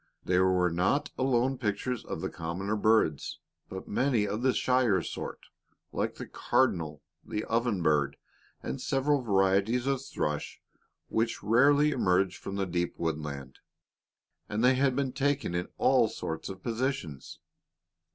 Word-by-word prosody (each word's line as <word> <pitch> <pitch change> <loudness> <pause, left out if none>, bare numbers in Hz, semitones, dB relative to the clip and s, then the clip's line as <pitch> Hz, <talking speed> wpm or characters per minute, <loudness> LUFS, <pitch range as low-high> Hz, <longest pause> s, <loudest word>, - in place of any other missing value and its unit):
There 90 +1 +3
were 90 -1 +2
not 95 - +1
alone 130 0 +1
pictures 115 +2 -2
of - - -5
the - - -2
commoner 90 +6 -3
birds, 105 -8 +2 0.3
but 95 0 -7
many 125 -2 +1
of 105 +3 -3
the 130 +1 +3
shyer 125 -8 +2
sort, - - -6 0.5
like - - -2
the - - -7
cardinal, 80 - 0 0.2
the 105 - -3
oven 115 -5 0
bird, 70 -3 +2 0.5
and - - -4
several 140 +1 +1
varieties 100 +3 +2
of 135 -1 0
thrush 75 - -3 0.5
which 115 -1 -1
rarely 140 +7 +4
emerge 95 -7 +2
from 100 - -6
the 100 -1 0
deep 85 -1 -2
woodland, 75 -5 -4 0.9
and 105 +3 -1
they 125 +1 +6
had 130 0 +2
been 135 -2 -1
taken 140 -8 0
in 90 0 -1
all - - +4
sorts 80 0 -5
of 95 -1 -9
positions. 115 - -3
105 Hz, 140 wpm, -29 LUFS, 90-130 Hz, 0.9 s, they